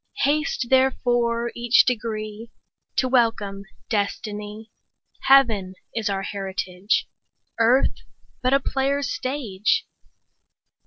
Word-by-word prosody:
35 285 Hz, -, +4 dB
Haste 280 Hz, -5 st, -3 dB
therefore 240 Hz, -3 st, +2 dB
each 240 Hz, 0 st, +4 dB
degree 220 Hz, -2 st, -3 dB, 0.5 s
To 260 Hz, -, +2 dB
welcome 225 Hz, -6 st, +1 dB, 0.2 s
destiny; 210 Hz, 0 st, -3 dB, 0.6 s
Heaven 225 Hz, -9 st, +4 dB, 0.2 s
is 225 Hz, -2 st, -1 dB
our 195 Hz, -1 st, -2 dB
heritage, 190 Hz, 0 st, -2 dB, 0.5 s
Earth 240 Hz, +4 st, +3 dB, 0.4 s
but 255 Hz, 0 st, +1 dB
a 275 Hz, -, +5 dB
player's 275 Hz, 0 st, -1 dB
stage. 265 Hz, -, -1 dB
230 Hz, 95 wpm, -23 LUFS, 205-260 Hz, 0.6 s, a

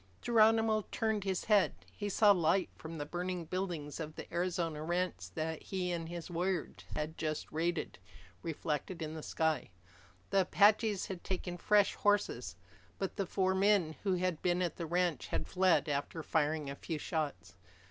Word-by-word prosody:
Geronimo 220 Hz, -2 st, +4 dB
turned 220 Hz, -2 st, 0 dB
his 190 Hz, -2 st, -1 dB
head. 210 Hz, -3 st, +4 dB, 0.2 s
He 205 Hz, -1 st, -3 dB
saw 205 Hz, +1 st, +6 dB
light 185 Hz, 0 st, +3 dB
from 160 Hz, +1 st, -8 dB
the 145 Hz, -, -3 dB
burning 175 Hz, +2 st, -3 dB
buildings 170 Hz, -5 st, -3 dB
of 155 Hz, -1 st, -5 dB
the -, -, -6 dB
Arizona 170 Hz, -3 st, -1 dB
ranch 170 Hz, -, -1 dB
that 160 Hz, 0 st, -2 dB
he 185 Hz, -2 st, -2 dB
and 165 Hz, -1 st, -3 dB
his 170 Hz, -2 st, -5 dB
warriors 175 Hz, 0 st, -1 dB, 0.2 s
had 155 Hz, +1 st, -3 dB
just 155 Hz, -1 st, -2 dB
raided, 165 Hz, -, -1 dB, 0.4 s
reflected 160 Hz, +2 st, -3 dB
in 155 Hz, 0 st, -4 dB
the 160 Hz, -, -6 dB
sky. 160 Hz, -5 st, 0 dB, 0.6 s
The 195 Hz, -, +5 dB
Apaches 205 Hz, +2 st, +4 dB
had 185 Hz, -3 st, -6 dB
taken 180 Hz, -1 st, -3 dB
fresh 205 Hz, +3 st, +3 dB
horses. 160 Hz, -, +1 dB, 0.4 s
But 195 Hz, -, -3 dB
the 195 Hz, -3 st, -2 dB
four 190 Hz, 0 st, +1 dB
men 190 Hz, -5 st, +3 dB
who 195 Hz, -3 st, +1 dB
had 180 Hz, -3 st, -1 dB
been 180 Hz, 0 st, +2 dB
at 170 Hz, -3 st, -2 dB
the 170 Hz, -, -4 dB
ranch 175 Hz, -3 st, 0 dB
had -, -, -2 dB
fled 185 Hz, -3 st, +3 dB
after 145 Hz, +2 st, -2 dB
firing 155 Hz, -1 st, +1 dB
a 140 Hz, -, -4 dB
few 160 Hz, +2 st, -4 dB
shots. 145 Hz, -, -3 dB
175 Hz, 170 wpm, -34 LUFS, 160-190 Hz, 0.6 s, saw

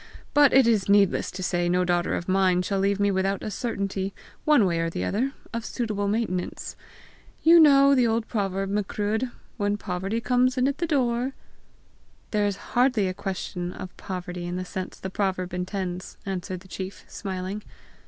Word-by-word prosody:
But 290 Hz, -2 st, +6 dB
it 265 Hz, -1 st, +6 dB
is 220 Hz, -4 st, +2 dB
needless 200 Hz, -1 st, +4 dB
to 185 Hz, 0 st, -6 dB
say 175 Hz, -1 st, 0 dB
no 180 Hz, +1 st, +2 dB
daughter 175 Hz, 0 st, +1 dB
of 175 Hz, -, -4 dB
mine 185 Hz, -1 st, +3 dB
shall 195 Hz, +1 st, -1 dB
leave 200 Hz, +1 st, +1 dB
me 205 Hz, 0 st, +3 dB
without 195 Hz, +1 st, 0 dB
a 215 Hz, -, -3 dB
certainty, 200 Hz, -4 st, -3 dB, 0.3 s
one 295 Hz, -9 st, +5 dB
way 170 Hz, -2 st, +1 dB
or 165 Hz, 0 st, 0 dB
the -, -, -3 dB
other, 255 Hz, +7 st, 0 dB, 0.2 s
of 230 Hz, 0 st, -2 dB
suitable 215 Hz, -5 st, -2 dB
maintenance. 200 Hz, -4 st, -2 dB, 0.7 s
You 335 Hz, +1 st, +8 dB
know 280 Hz, -3 st, +7 dB
the 250 Hz, -3 st, +4 dB
old 225 Hz, 0 st, 0 dB
proverb, 195 Hz, -2 st, -1 dB
Macruadh, 210 Hz, +4 st, -1 dB, 0.3 s
'When 205 Hz, -1 st, 0 dB
poverty 195 Hz, +2 st, -2 dB
comes 250 Hz, +2 st, +2 dB
in 255 Hz, +1 st, +3 dB
at 280 Hz, 0 st, -2 dB
the 340 Hz, -, 0 dB
door,' 255 Hz, -3 st, +1 dB, 0.5 s
?" -, -, -35 dB
"There 210 Hz, -1 st, +2 dB
is 200 Hz, -1 st, -2 dB, 0.2 s
hardly 245 Hz, -5 st, +3 dB
a -, -, -3 dB
question 180 Hz, -2 st, -4 dB
of 185 Hz, -, -8 dB
poverty 180 Hz, -1 st, -5 dB
in 175 Hz, -, -3 dB
the 185 Hz, 0 st, -3 dB
sense 185 Hz, 0 st, -6 dB
the 190 Hz, -, -5 dB
proverb 185 Hz, -3 st, -1 dB
intends!" 180 Hz, 0 st, -4 dB
answered 185 Hz, -1 st, -4 dB
the 190 Hz, -, -15 dB
chief 190 Hz, +1 st, -7 dB
smiling. 190 Hz, +1 st, -5 dB
200 Hz, 185 wpm, -26 LUFS, 185-230 Hz, 0.7 s, You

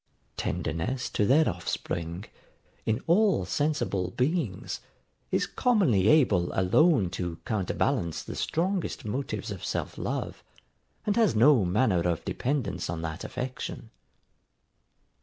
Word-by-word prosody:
Tenderness 100 Hz, -, -2 dB
to 105 Hz, -, +1 dB
their 150 Hz, +4 st, +5 dB
offspring, 85 Hz, +3 st, -3 dB, 0.6 s
in 110 Hz, +3 st, 0 dB
all 195 Hz, +3 st, +3 dB
sensible 145 Hz, -, 0 dB
beings, 130 Hz, -, -1 dB, 0.5 s
is -, -, +1 dB
commonly 160 Hz, -, +2 dB
able 110 Hz, -, +4 dB
alone 100 Hz, -, +4 dB
to 90 Hz, -3 st, -4 dB
counter 100 Hz, -5 st, -1 dB
balance 85 Hz, -2 st, 0 dB
the -, -, -7 dB
strongest 180 Hz, -, -1 dB
motives 110 Hz, -3 st, -3 dB
of 95 Hz, -4 st, -7 dB
self -, -, -3 dB
love, -, -, -3 dB, 0.6 s
and 205 Hz, -, +1 dB
has 225 Hz, -, +3 dB
no 120 Hz, 0 st, +6 dB
manner 95 Hz, +1 st, +2 dB
of 85 Hz, -, -2 dB
dependance 115 Hz, -, -2 dB
on 80 Hz, 0 st, -3 dB
that 80 Hz, +1 st, -4 dB
affection. 125 Hz, -2 st, -5 dB
110 Hz, 120 wpm, -28 LUFS, 90-150 Hz, 0.6 s, no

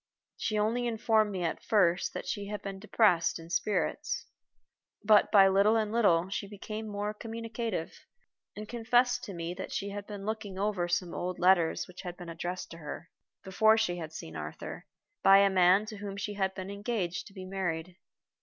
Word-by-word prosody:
She 215 Hz, -, -2 dB
only 230 Hz, +4 st, +1 dB
informed 220 Hz, -2 st, +2 dB
me 185 Hz, -3 st, -3 dB
at 165 Hz, -, -2 dB
first 180 Hz, -4 st, +2 dB
that -, -, -4 dB
she 200 Hz, +2 st, -3 dB
had 210 Hz, 0 st, -5 dB
been 195 Hz, -1 st, -5 dB
depressed 190 Hz, -5 st, +3 dB
in 165 Hz, 0 st, -11 dB
spirits, 210 Hz, +3 st, -1 dB, 0.8 s
but 210 Hz, 0 st, +5 dB
by 195 Hz, -2 st, +8 dB
little 200 Hz, +3 st, +4 dB
and 215 Hz, -2 st, +1 dB
little 185 Hz, -7 st, +3 dB
she 200 Hz, 0 st, -3 dB
became 215 Hz, +2 st, -6 dB
more 205 Hz, 0 st, -3 dB
communicative, 225 Hz, -4 st, -4 dB, 0.6 s
and 210 Hz, +1 st, -7 dB
confessed 245 Hz, +2 st, +2 dB
to 195 Hz, -, -7 dB
me 170 Hz, +1 st, -4 dB
that 190 Hz, +1 st, -7 dB
she 200 Hz, -, -3 dB
had 200 Hz, 0 st, -6 dB
been 205 Hz, -2 st, -7 dB
looking 215 Hz, -3 st, -4 dB
over 200 Hz, -3 st, 0 dB
some 175 Hz, 0 st, -1 dB
old 180 Hz, 0 st, -3 dB
letters 180 Hz, -3 st, +3 dB
which 180 Hz, +1 st, -10 dB
had 180 Hz, -2 st, -7 dB
been 175 Hz, -1 st, -8 dB
addressed 175 Hz, +2 st, -5 dB
to 165 Hz, -, -9 dB
her, 155 Hz, +2 st, -8 dB, 0.3 s
before 220 Hz, +4 st, +4 dB
she 180 Hz, -6 st, 0 dB
had 160 Hz, -2 st, -6 dB
seen 80 Hz, -, -8 dB
Arthur, 75 Hz, 0 st, -7 dB, 0.3 s
by 195 Hz, 0 st, +8 dB
a 200 Hz, 0 st, +5 dB
man 185 Hz, +2 st, +5 dB
to 215 Hz, -1 st, -8 dB
whom 200 Hz, -1 st, -6 dB
she 205 Hz, +1 st, -3 dB
had 190 Hz, -1 st, -1 dB
been 190 Hz, +1 st, -6 dB
engaged 200 Hz, -5 st, -3 dB
to 195 Hz, -, -15 dB
be 190 Hz, -2 st, -8 dB
married. 180 Hz, -2 st, -3 dB
195 Hz, 190 wpm, -30 LUFS, 180-215 Hz, 0.8 s, by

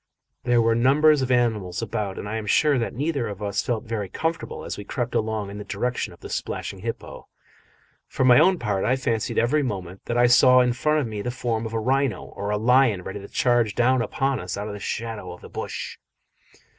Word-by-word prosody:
There 120 Hz, -2 st, +3 dB
were 115 Hz, 0 st, +3 dB
numbers 140 Hz, +5 st, +4 dB
of 130 Hz, -, -1 dB
animals 110 Hz, -7 st, 0 dB
about, 100 Hz, -2 st, -3 dB
and -, -, -5 dB
I 110 Hz, +2 st, -3 dB
am 110 Hz, -1 st, -5 dB
sure 145 Hz, +5 st, +3 dB
that 115 Hz, -, -3 dB
neither 140 Hz, -2 st, -1 dB
of 105 Hz, 0 st, -6 dB
us 100 Hz, -1 st, -1 dB
felt 115 Hz, -3 st, -2 dB
very 110 Hz, -4 st, -4 dB
comfortable 165 Hz, -, -3 dB
as -, -, -4 dB
we 105 Hz, -, -7 dB
crept 120 Hz, +4 st, -3 dB
along 110 Hz, -3 st, -1 dB
in 100 Hz, -, -7 dB
the -, -, -5 dB
direction 110 Hz, +5 st, -2 dB
of -, -, -16 dB
the -, -, -8 dB
splashing -, -, -4 dB
hippo; -, -, -6 dB, 0.8 s
for 130 Hz, -, -1 dB
my 125 Hz, -1 st, +7 dB
own 185 Hz, +4 st, +5 dB
part 105 Hz, -, -1 dB
I 125 Hz, -, +2 dB
fancied 115 Hz, -4 st, -2 dB
every 130 Hz, +6 st, +3 dB
moment 95 Hz, -7 st, -5 dB
that 120 Hz, -, -2 dB
I 120 Hz, -, +5 dB
saw 125 Hz, +1 st, +6 dB
in 125 Hz, -1 st, +2 dB
front 150 Hz, +5 st, +1 dB
of -, -, -2 dB
me 110 Hz, -2 st, -5 dB
the 125 Hz, -, -3 dB
form 115 Hz, -2 st, -2 dB
of 110 Hz, -, -9 dB
a 115 Hz, -, 0 dB
rhino 130 Hz, -2 st, 0 dB
or 100 Hz, +1 st, -6 dB
a 105 Hz, -, +1 dB
lion 120 Hz, -3 st, +3 dB
ready 95 Hz, +2 st, -6 dB
to 100 Hz, -, -10 dB
charge 120 Hz, -3 st, +1 dB
down 125 Hz, +1 st, +3 dB
upon 135 Hz, +1 st, -1 dB
us 90 Hz, +1 st, -5 dB
out 100 Hz, -, -4 dB
of 105 Hz, -, -5 dB
the 105 Hz, -, -7 dB
shadow 105 Hz, -4 st, -4 dB
of 90 Hz, -, -13 dB
the -, -, -11 dB
bush. -, -, -6 dB
115 Hz, 230 wpm, -24 LUFS, 105-125 Hz, 0.8 s, my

